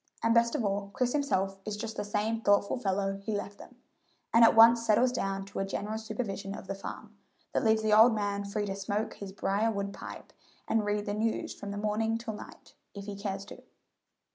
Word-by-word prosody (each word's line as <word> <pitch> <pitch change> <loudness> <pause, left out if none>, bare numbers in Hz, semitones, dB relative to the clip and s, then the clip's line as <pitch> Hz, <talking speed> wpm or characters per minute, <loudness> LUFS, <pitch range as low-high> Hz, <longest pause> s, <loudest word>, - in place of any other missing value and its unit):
And 230 - +4
best 235 0 +3
of 225 - 0
all, 200 0 -1
Chris 250 -1 +1
himself 195 -10 0
is 210 0 -4
just 220 +1 -5
the - - -2
same 210 +2 -1
thoughtful 205 +3 +2
fellow 195 -2 -1
he 215 0 -2
left 205 0 -7
them, 250 - -13 0.6
and 230 - +7
at 225 - +7
once 230 +1 +8
settles 230 +3 +4
down 195 -5 -2
to 195 - -6
a - - +1
general 210 +2 -3
supervision 210 -3 -4
of - - -9
the 195 - -3
farm, 195 - -8 0.4
that - - +1
leaves 220 -1 +3
the 215 -1 +2
old 225 +2 +7
man 205 -1 -1
free 205 +1 -2
to 195 -1 -3
smoke 200 +2 -2
his 200 -1 -8
brier 200 +3 0
wood 200 -2 -3
pipe - - -9 0.3
and 220 -1 +1
read 205 0 -1
the 205 - -2
news 220 +2 -1
from 205 - -8
morning 220 +2 0
till 230 -1 -5
night, 210 - -12 0.2
if 200 0 -7
he 205 -1 -5
cares 195 -1 -4
to. - - -11
210 Hz, 215 wpm, -30 LUFS, 200-225 Hz, 0.6 s, once